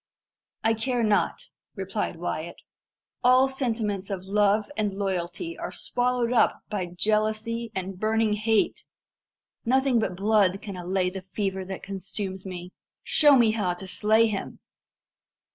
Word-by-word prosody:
"I 225 - +4
care 240 +2 -1
not," 210 -2 +2 0.4
replied 195 -1 -3
Wyat. 170 0 -4 0.7
"All 255 +2 +6
sentiments 225 -7 -2
of 190 -2 -4
love 205 +1 +3
and 210 -2 0
loyalty 195 - -3
are - - -4
swallowed 245 -1 0
up 225 -3 +3
by 190 -4 -2
jealousy 215 +5 0
and 190 0 -4
burning 220 0 +2
hate. 215 +1 +1 0.8
Nothing 260 0 +3
but 185 -5 -2
blood 200 -2 +3
can 200 -2 -7
allay 180 +1 -1
the 190 0 -6
fever 190 0 -3
that 190 0 -7
consumes 190 0 -5
me. 180 -1 -7 0.3
Show 295 -2 +6
me 235 -4 +5
how 200 -5 0
to 185 - -8
slay 215 +4 +3
him!" 210 -3 -3
210 Hz, 135 wpm, -26 LUFS, 190-225 Hz, 0.8 s, All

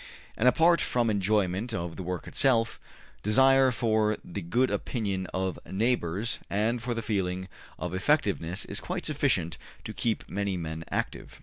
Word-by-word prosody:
And 120 - +2
apart 165 +7 +5
from 120 -2 +1
enjoyment 105 +2 +1
of 85 -3 -4
the - - -6
work 90 0 -4
itself, 115 -4 +2 0.4
desire 135 +5 +5
for 110 -3 +1
the 100 +3 -5
good 120 +10 +1
opinion 100 -6 -2
of 95 -1 -2
neighbors 105 -1 -1
and 110 +4 0
for 120 0 -2
the 115 - -3
feeling 95 -3 -1 0.3
of 90 +2 -4
effectiveness 95 - +1
is - - -3
quite 180 0 -4
sufficient 135 - 0 0.2
to - - -6
keep 115 -2 -1
many 100 -1 -2
men 80 -1 -5
active. - - -4
105 Hz, 150 wpm, -28 LUFS, 95-120 Hz, 0.4 s, apart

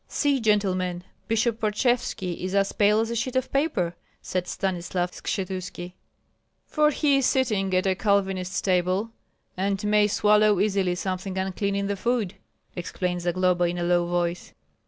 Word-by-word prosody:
"See, 285 -2 +1
gentlemen, 185 -5 0 0.2
Bishop 225 0 +1
Parchevski 215 -4 0
is 185 +2 -3
as 195 0 +2
pale 210 +1 +3
as 225 +1 -2
a - - -2
sheet 240 +3 -2
of 260 0 0
paper!" 235 - 0 0.2
said 185 -1 -3
Stanislav 180 -2 -2
Skshetuski. 185 -2 -5 0.7
"For 300 -1 +2
he 290 -1 +2
is 270 -2 +2
sitting 215 -8 +1
at 185 - +2
a 190 - +3
Calvinist 190 -2 0
table, 185 +4 +1 0.4
and 195 +2 -1
may 210 0 +3
swallow 210 -1 +3
easily 195 -3 +1
something 185 +1 -4
unclean 195 +1 -1
in 200 0 -1
the 200 0 -1
food," 225 -2 -1 0.4
explained 180 0 -3
Zagloba, 180 0 +1
in 175 +1 -1
a 175 - -2
low 175 0 +2
voice. 175 0 -2
195 Hz, 155 wpm, -25 LUFS, 180-215 Hz, 0.7 s, pale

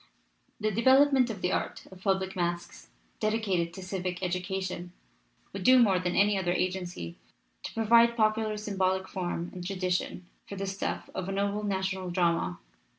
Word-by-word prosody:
The 215 0 0
development 260 +3 +5
of 205 -4 -6
the 180 - +1
art - - -2
of 185 -1 -13
public 190 -1 0
masques, 175 -1 -3 0.3
dedicated 210 -6 0
to 190 - -7
civic 185 -1 -4
education, 180 0 -3 0.6
would - - -5
do 255 0 +7
more 200 -7 +5
than 180 -1 -1
any 205 0 +4
other 175 -2 0
agency 180 - -3 0.4
to - - -7
provide 235 +1 +5
popular 215 -1 +2
symbolic 190 -2 0
form 175 -2 -3
and 180 - -7
tradition 180 -1 -2 0.2
for 200 - -6
the 195 0 -3
stuff 195 0 -3
of 185 0 -4
a - - -1
noble 200 +1 0
national 190 -2 -2
drama. 170 - +1
190 Hz, 155 wpm, -29 LUFS, 180-210 Hz, 0.6 s, do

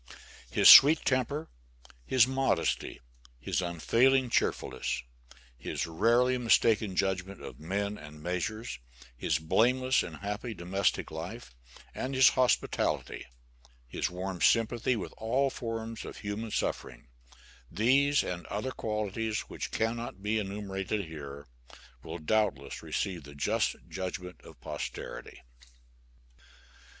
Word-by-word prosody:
His - - +4
sweet 150 +3 +10
temper, 135 +4 0 0.6
his 130 -3 +5
modesty, 135 +1 0 0.4
his 60 - -1
unfailing 120 +9 +2
cheerfulness, 65 - -1 0.6
his - - -3
rarely 120 +9 +2
mistaken 110 -4 +3
judgment 95 0 -1
of - - -9
men 100 +5 -3
and 75 0 -11
measures; 90 - -3 0.4
his - - 0
blameless 125 +11 +2
and 80 - -6
happy 105 +5 -5
domestic 90 +1 -1
life, 80 - -7 0.4
and 130 +1 -4
his 130 -1 +7
hospitality; 130 -1 0 0.6
his - - -2
warm 90 0 -5
sympathy 115 +2 +3
with 105 - -5
all 130 +5 +1
forms 115 -2 -5
of - - -8
human 105 +2 -4
suffering - - -3 0.6
these 135 +8 +3
and 90 -1 -5
other 105 +6 -3
qualities 110 -1 -2
which - - -6
cannot 115 -3 -3
be 110 +1 +1
enumerated 100 0 -3
here, 70 -3 -9 0.6
will 80 - -7
doubtless 85 -5 -1
receive 90 -5 -3
the 70 +1 -12
just 70 - 0
judgment 90 -2 -6
of - - -15
posterity. - - -7
105 Hz, 115 wpm, -30 LUFS, 90-120 Hz, 0.6 s, sweet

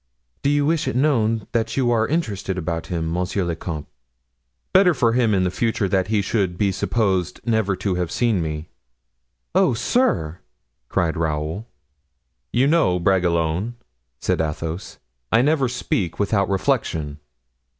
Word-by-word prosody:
"Do 140 - +1
you 145 0 +2
wish 160 -2 +1
it 130 - -1
known 115 -6 +2
that 115 0 -1
you 125 -3 +2
are 110 -1 +2
interested 100 - -2
about 85 -1 -3
him, 80 -2 -2
monsieur 90 +2 -1
le 85 -1 -2
comte?" 80 -3 -5 0.9
"Better 185 -3 +6
for 120 -3 +2
him 115 -4 +3
in 95 -1 +2
future 115 -1 0
that 95 0 +1
he 105 -2 +1
should 95 -4 0
be 100 0 +2
supposed 95 -3 0
never 110 -4 +1
to 95 0 -1
have 90 -2 -1
seen 110 -1 +1
me." 80 0 -4 0.9
"Oh, - - +3
sir!" 90 - +1 0.5
cried 80 -2 0
Raoul. 80 +6 -2 0.8
"You 125 +3 +3
know, 145 - +3
Bragelonne," 90 +3 +1 0.4
said - - 0
Athos, 80 +3 -4 0.3
"I 115 - +5
never 140 -3 +2
speak 95 -8 -2
without 100 -1 +1
reflection." 95 - -1
100 Hz, 145 wpm, -22 LUFS, 85-120 Hz, 0.9 s, Better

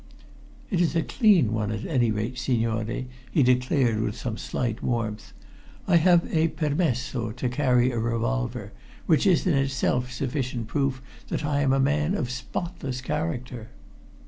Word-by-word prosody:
"It 180 -3 +2
is 170 -1 +1
a 165 - +2
clean 190 - +3
one, 110 -1 -1
at 110 0 -4
any 125 -7 +2
rate, 110 +3 -2
signore," 115 -1 -1 0.3
he 145 - +3
declared 125 -2 +2
with - - -2
some - - -3
slight 110 - -3
warmth. 115 -3 -2 0.6
"I 175 - +5
have 170 +1 +5
a 160 +1 +4
permesso 140 -7 -1
to 125 +1 -2
carry 125 -1 +2
a 120 - -2
revolver, 110 - -2 0.3
which 155 - +3
is 180 -3 +3
in 180 - +3
itself 135 -2 0
sufficient 125 -2 -3
proof 130 +2 -1 0.2
that 150 - -2
I 145 -1 +1
am 135 -2 +2
a 135 - +3
man 150 +6 +1
of 125 -10 -2
spotless 135 +1 -4
character." 125 -5 -4
130 Hz, 155 wpm, -26 LUFS, 115-150 Hz, 0.6 s, I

